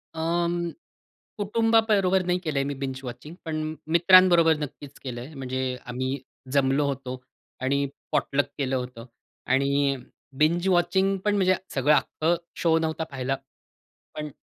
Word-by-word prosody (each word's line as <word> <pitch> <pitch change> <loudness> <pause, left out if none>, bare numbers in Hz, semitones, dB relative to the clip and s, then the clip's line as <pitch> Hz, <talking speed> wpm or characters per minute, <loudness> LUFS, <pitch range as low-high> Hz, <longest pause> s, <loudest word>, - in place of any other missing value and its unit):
अं, 170 +1 0 0.7
कुटुंबाबरोबर 210 -3 +3
नाही 180 0 +1
केलंय 155 -6 -1
मी 140 +1 -2
बिंज 135 -1 -3
वॉचिंग. 125 +6 -8
पण 155 -1 -3 0.2
मित्रांबरोबर 175 -2 +7
नक्कीच 145 -1 -8
केलंय. 125 +2 -6
म्हणजे 130 -1 -3
आम्ही 130 +2 -2 0.3
जमलो 140 +1 +3
होतो 130 -2 -4 0.4
आणि 140 +2 +1 0.2
पॉटलक 140 +1 +1
केलं 135 -2 0
होतं 125 -2 -5 0.5
आणि 140 +1 +2 0.4
बिंज 170 +5 +2
वॉचिंग 190 +2 +2
पण 210 0 +3
म्हणजे 185 -2 +3 0.2
सगळं 140 +2 +4
अख्खं 160 +3 +1 0.2
शो 165 -1 +3
नव्हता 160 0 -1
पाहिला. 135 0 -1 0.8
पण 150 0 -4
150 Hz, 125 wpm, -26 LUFS, 135-175 Hz, 0.8 s, मित्रांबरोबर